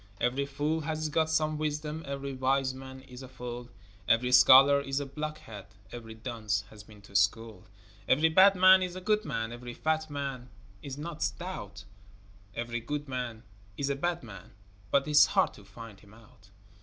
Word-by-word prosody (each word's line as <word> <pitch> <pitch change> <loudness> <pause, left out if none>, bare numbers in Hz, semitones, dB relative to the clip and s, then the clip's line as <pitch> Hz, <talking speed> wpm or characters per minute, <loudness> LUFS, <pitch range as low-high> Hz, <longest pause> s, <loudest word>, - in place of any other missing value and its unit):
Every 130 +3 0
fool 145 +3 -1
has 155 +1 -3
got 160 +1 +1
some 155 -1 0
wisdom, 150 +1 -3
Every 140 0 -5
wise 130 0 0
man 130 0 -10
is 130 -1 -12
a 130 - -9
fool, 125 -1 -8 0.4
Every 125 +2 +2
scholar 135 +2 +7
is 135 0 -2
a 140 - -4
block 155 +2 -5
head, 115 -10 -11 0.2
Every 115 -2 -9
dunce 110 -3 -3
has 105 - -12
been 105 -1 -17
to 100 - -17
school. 100 +1 0 0.4
Every 155 +5 +4
bad 190 +4 +6
man 185 +1 +7
is 180 -1 -3
a - - -5
good 215 +2 +1
man, 115 0 -3
Every 120 0 -8
fat 155 0 -1
man 135 -3 -5 0.3
is 135 +2 -7
not 160 +1 -7
stout, 105 - -5 0.7
Every 120 0 -3
good 145 +5 -5
man 125 -3 -5 0.3
is 140 0 -1
a - - -1
bad 175 +3 -2
man 100 -6 -12 0.4
But 140 +3 +2
'tis 150 -1 +6
hard - - +3
to 105 - -15
find 105 0 -12
him 105 +1 -18
out. 105 -3 -20
135 Hz, 180 wpm, -29 LUFS, 115-150 Hz, 0.7 s, scholar